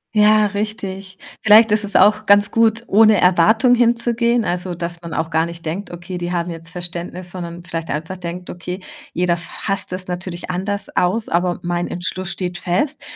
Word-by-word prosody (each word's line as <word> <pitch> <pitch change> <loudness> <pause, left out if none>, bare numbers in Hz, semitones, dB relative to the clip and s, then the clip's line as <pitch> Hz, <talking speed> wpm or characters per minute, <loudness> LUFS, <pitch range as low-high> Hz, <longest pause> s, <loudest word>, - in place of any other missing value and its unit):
Ja, 210 0 +5
richtig. 200 -2 -5 0.2
Vielleicht 220 +1 +6
ist 210 0 +2
es 205 - 0
auch 210 +2 +5
ganz 205 0 +5
gut, 225 0 +2
ohne 215 +1 +5
Erwartung 220 +8 +4
hinzugehen, 235 0 +2
also, 180 -2 -3
dass 170 0 -5
man 170 -1 -7
auch 160 0 -2
gar 160 +1 +1
nicht 170 0 -8
denkt: 175 +6 -4
„Okay, 175 +1 -7
die 175 0 -3
haben 170 0 -2
jetzt 165 0 -9
Verständnis“, 175 0 -6
sondern 175 -1 -7
vielleicht 165 -2 -5
einfach 160 +5 -4
denkt: 180 0 -7
„Okay, 180 +2 -6 0.3
jeder 175 0 +1
fasst 195 +3 -3
das 185 0 -3
natürlich 180 0 -5
anders 200 +3 -3
aus, 210 +5 +1
aber 175 +1 0
mein 175 0 -1
Entschluss 180 +1 -4
steht 180 -2 -3
fest 195 - -1
180 Hz, 180 wpm, -19 LUFS, 175-210 Hz, 0.3 s, Vielleicht